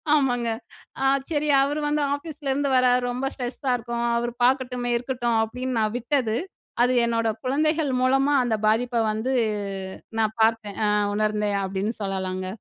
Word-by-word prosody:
ஆமாங்க, 245 -5 +1 0.5
அ - - 0 0.3
சரி, 300 -2 0
அவர் 290 +2 -1
வந்து 300 0 +1
ஆஃபீஸ்லருந்து 285 -2 -3
வரார், 250 0 +3
ரொம்ப 250 +2 -3
ஸ்ட்ரெஸ்ஸா 255 +1 -3
இருக்கும், 235 0 -4
அவரு 240 0 -1
பார்க்கட்டுமே! 250 -1 0
இருக்கட்டும். 240 -2 -1
அப்பிடின்னு 250 +2 -3
நான் 215 +1 0
விட்டது, 245 -2 0 0.5
அது 250 +1 +3
என்னோட 230 -1 0 0.2
குழந்தைகள் 305 +2 +1
மூலமா 270 +3 +3
அந்த 225 -3 0
பாதிப்ப 235 +2 +2
வந்து 220 +5 -2 0.9
நான் 220 0 0
பார்த்தேன். 220 -3 0
அ - - +2 0.3
உணர்ந்தேன் 210 -1 0
அப்பிடின்னு 195 +4 -2
சொல்லலாங்க. 185 -1 -3
245 Hz, 140 wpm, -24 LUFS, 220-270 Hz, 0.9 s, வரார்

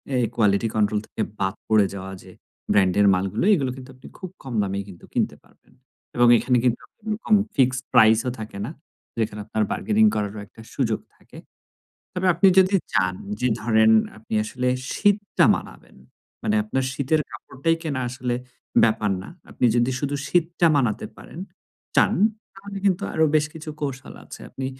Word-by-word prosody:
এই 125 - +2
quality 105 -1 +2
control 105 -1 +2
থেকে - - -5 0.2
বাদ 95 0 -1
পড়ে 110 -2 +4
যাওয়া 95 -1 -7
যে - - -14 0.4
ব্র্যান্ডের 100 +1 +4
মালগুলো 95 - -1
এগুলো 140 -9 +1
কিন্তু 130 0 -11
আপনি 130 - -14
খুব 185 - -7
কম 130 -2 -7
দামেই 100 0 -3
কিন্তু 90 -3 -13
কিনতে - - 0
পারবেন। - - -27 0.4
এবং 120 0 +5
এখানে 125 +1 +1
কিন্তু 125 -2 +1 0.8
ফিক্সড 130 0 +2
প্রাইস 110 0 +6
ও - - +2
থাকে 110 -2 -7
না, 130 - -6 0.5
যেখানে 105 -1 -2
আপনার 110 0 -1
বার্গেনিং 215 +1 +2
করারও 105 0 -3
একটা 115 - -15
সুযোগ 115 -5 0 0.2
থাকে। - - -17 0.8
তবে 185 0 -1
আপনি 180 +4 +4
যদি 190 +1 +5 0.2
চান 95 -2 +2 0.3
যে 125 - +2
ধরেন 110 0 +4 0.3
আপনি 110 0 -7
আসলে 125 +3 -2 0.3
শীতটা 205 0 +2
মানাবেন, - - -11 0.5
মানে 215 - 0
আপনার 135 -12 -2
শীতের 140 +3 0
কাপড়টাই 165 +5 -2
কেনা 145 -5 -2
আসলে 125 -1 -3 0.5
ব্যাপার 110 -2 +1
না, - - -10 0.2
আপনি 125 - +1
যদি 120 +2 +2
শুধু 145 +1 -2
শীতটা 170 +1 +1
মানাতে 115 -6 0
পারেন - - -12 0.6
চান - - +5 0.4
তাহলে 200 0 -8
কিন্তু 195 -1 +2
আরো 160 - +3
বেশ 150 -1 +3
কিছু 160 -1 -7
কৌশল 135 -3 -5
আছে। - - -11
আপনি 135 - -5
125 Hz, 160 wpm, -23 LUFS, 105-155 Hz, 0.8 s, প্রাইস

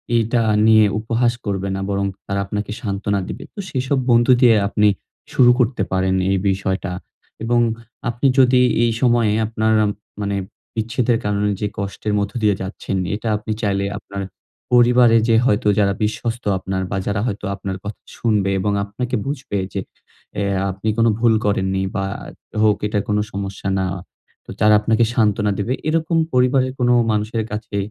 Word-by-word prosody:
এইটা 115 +1 +2 0.3
নিয়ে 110 -1 +6
উপহাস 115 +2 +1
করবে 100 -1 -2
না। - - -3
বরং 100 0 0 0.2
তারা 100 0 -1
আপনাকে 105 +1 -4
সান্ত্বনা 100 -1 -1
দিবে। - - -6
তো - - -10
সেসব 130 +1 -1
বন্ধু 120 +2 +5
দিয়ে 120 -3 +6
আপনি 105 0 +2 0.5
শুরু 125 -1 +6
করতে 120 -4 +1
পারেন 95 0 +1
এই 95 - +2
বিষয়টা। 95 0 -2 0.5
এবং 120 +1 +2 0.5
আপনি 120 +4 0
যদি 125 -1 +5 0.2
এই 115 - +2
সময়ে 120 -4 +3 0.2
আপনার 110 0 0 0.5
মানে 100 -1 -1 0.4
বিচ্ছেদের 115 +2 0
কারণে 105 0 0
যে 105 - +1
কষ্টের 100 +1 -3
মধ্য 100 0 -2
দিয়ে 105 -2 +3
যাচ্ছেন 95 0 -4 0.2
এটা 110 +2 -5
আপনি 110 +1 -6
চাইলে 100 -2 0
আপনার 100 -1 -7 0.5
পরিবারে 120 -1 +6
যে 115 - +4
হয়তো 105 -4 +2
যারা 100 -1 +3
বিশ্বস্ত 115 +3 -2
আপনার 95 0 -3
বা 100 - -1
যারা 100 0 0
হয়তো 105 -2 -4
আপনার 95 -1 -5
কথা 105 +1 -7 0.2
শুনবে 105 -4 +1
এবং 100 +2 0
আপনাকে 125 +5 -4
বুঝবে 135 -7 -3 0.2
যে - - -2 0.6
এ - - +1 0.3
আপনি 100 +4 -7
কোন 115 0 +4
ভুল 115 -1 +4
করেননি 95 -1 0
বা 95 - -1 0.6
হোক 105 -1 +4
এটা 105 -1 0
কোন 105 - +1
সমস্যা 100 0 -5
না। 95 - 0 0.6
তো - - -19
তারা 105 0 +5
আপনাকে 110 +2 +2
সান্ত্বনা 105 -3 +2
দেবে। 115 +6 -1
এরকম 165 +1 +1 0.2
পরিবারের 130 +1 +2
কোন 125 -1 +2 0.2
মানুষের 110 +1 -1
কাছে 105 -1 -4
105 Hz, 160 wpm, -20 LUFS, 100-120 Hz, 0.6 s, নিয়ে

